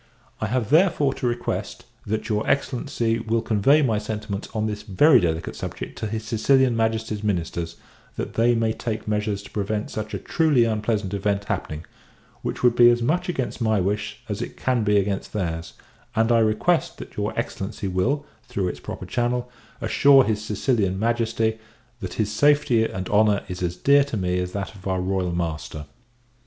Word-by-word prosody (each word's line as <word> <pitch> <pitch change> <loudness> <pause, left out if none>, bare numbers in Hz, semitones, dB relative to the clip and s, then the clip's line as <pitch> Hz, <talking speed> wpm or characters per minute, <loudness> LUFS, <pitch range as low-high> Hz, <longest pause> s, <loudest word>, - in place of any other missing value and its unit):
I 110 - -1
have, 120 0 -1
therefore, 155 -4 +4
to 130 - -2
request, 120 0 -3 0.2
that 110 +2 -2
your 105 -2 -1
Excellency 120 -4 0
will 115 0 -1
convey 125 +8 +4
my 110 -5 +1
sentiments 105 -1 -5
on 110 -1 -1
this 105 -1 -3
very 125 - +5
delicate 85 -3 -2
subject - - -6
to 110 - -2
his 110 +1 -4
Sicilian 125 +3 +3
Majesty's 110 -1 -1
ministers, 85 -4 -2 0.4
that - - -4
they 120 +1 +3
may 115 -1 +1
take 110 -2 -4
measures 105 -1 -1
to - - -13
prevent 105 +1 -2
such 110 0 -4
a - - -1
truly 155 -7 +2
unpleasant 105 -3 -1
event 100 0 0
happening; 80 -5 -4 0.6
which - - -4
would 120 -1 +5
be 120 0 +8
as 120 0 +2
much 175 +8 0
against 130 -7 -3
my 110 -2 +2
wish 105 +3 -2
as 105 0 -3
it - - -6
can 125 -3 +1
be 105 -1 +3
against 100 0 -1
their's: 85 -5 -3 0.4
and 115 +1 +3
I 115 - +5
request 110 -1 +1
that - - -10
your - - -1
Excellency 100 0 -3
will, 120 +11 0 0.2
through 95 -2 -1
its - - -6
proper - - -7
channel, 125 0 -1 0.3
assure 135 +4 +6
his 110 -2 -1
Sicilian 105 -3 0
Majesty, 115 0 0 0.4
that - - -6
his 105 -1 0
safety 145 -1 +3
and 95 -3 -4
honour 105 -1 +3
is 90 -1 -6
as 90 -1 -1
dear 140 +8 +5
to 140 -6 -4
me 90 -1 0
as 90 0 -3
that 100 0 -4
of 100 -2 -10
our 95 -1 0
Royal 90 -1 -1
Master. 80 -3 -4
110 Hz, 180 wpm, -24 LUFS, 100-120 Hz, 0.6 s, be